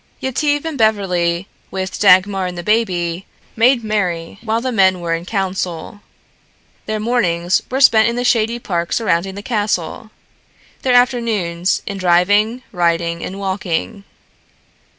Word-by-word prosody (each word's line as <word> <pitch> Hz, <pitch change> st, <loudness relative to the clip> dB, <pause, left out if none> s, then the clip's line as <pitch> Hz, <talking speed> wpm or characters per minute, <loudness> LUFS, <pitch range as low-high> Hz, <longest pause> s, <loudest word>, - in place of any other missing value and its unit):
Yetive 290 Hz, +3 st, -1 dB
and 315 Hz, -4 st, -4 dB
Beverly, 185 Hz, -5 st, +1 dB, 0.2 s
with 190 Hz, 0 st, -4 dB
Dagmar 195 Hz, -1 st, +4 dB
and 180 Hz, -1 st, -6 dB
the 175 Hz, -, -5 dB
baby, 185 Hz, -5 st, 0 dB, 0.3 s
made 235 Hz, +1 st, +3 dB
merry 185 Hz, -5 st, -2 dB
while 225 Hz, 0 st, -1 dB
the 255 Hz, +2 st, -3 dB
men 190 Hz, -5 st, +3 dB
were 170 Hz, -1 st, -2 dB
in 165 Hz, +1 st, -3 dB
council. 190 Hz, -1 st, -3 dB, 0.9 s
Their 215 Hz, 0 st, -2 dB
mornings 185 Hz, -7 st, +1 dB
were 265 Hz, +2 st, -1 dB
spent 220 Hz, -5 st, +6 dB
in 235 Hz, -, -3 dB
the 245 Hz, -, -1 dB
shady 230 Hz, -1 st, +2 dB
park 170 Hz, -7 st, -3 dB
surrounding 190 Hz, -4 st, 0 dB
the 200 Hz, -, -8 dB
castle, 210 Hz, -3 st, -2 dB, 0.7 s
their 255 Hz, -2 st, +2 dB
afternoons 220 Hz, -8 st, +1 dB
in 200 Hz, -, -5 dB
driving, 205 Hz, +7 st, +2 dB
riding 170 Hz, -2 st, 0 dB
and 190 Hz, -, -6 dB
walking. 195 Hz, +1 st, -3 dB
200 Hz, 135 wpm, -18 LUFS, 175-230 Hz, 0.9 s, spent